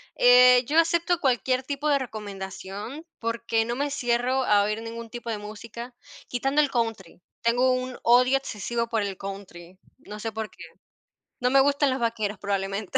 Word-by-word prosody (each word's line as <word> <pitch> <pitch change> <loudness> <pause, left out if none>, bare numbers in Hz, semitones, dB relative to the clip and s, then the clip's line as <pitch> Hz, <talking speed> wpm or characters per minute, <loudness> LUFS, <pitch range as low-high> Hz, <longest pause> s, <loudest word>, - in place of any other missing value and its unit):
eh, 250 0 +7
yo 305 +3 0
acepto 340 +1 +2
cualquier 255 -1 +1
tipo 285 +2 -3
de 285 -1 +4
recomendación, 205 - -7
porque 230 -1 -1
no 240 +2 -3
me 285 +1 -1
cierro 250 0 0
a 205 -3 +4
oír 215 +2 -2
ningún 230 0 -7
tipo 240 0 -7
de 220 - -2
música, 230 +3 -9 0.3
quitando 270 +4 0
el 290 -2 +3
Country, 225 -8 -3 0.2
tengo 245 +2 +3
un 255 0 -2
odio 250 +3 +5
excesivo 235 -1 -3
por 225 -3 0
el 195 -2 -4
Country, 190 -2 -9 0.2
no 210 +1 -10
sé 225 0 -4
por 220 0 -4
qué, - - -12 0.8
no 250 - +2
me 270 +1 +5
gustan 285 +1 +3
los 260 0 -1
vaqueros, 220 -3 -2
probablemente. 200 0 -2
235 Hz, 170 wpm, -25 LUFS, 210-260 Hz, 0.8 s, eh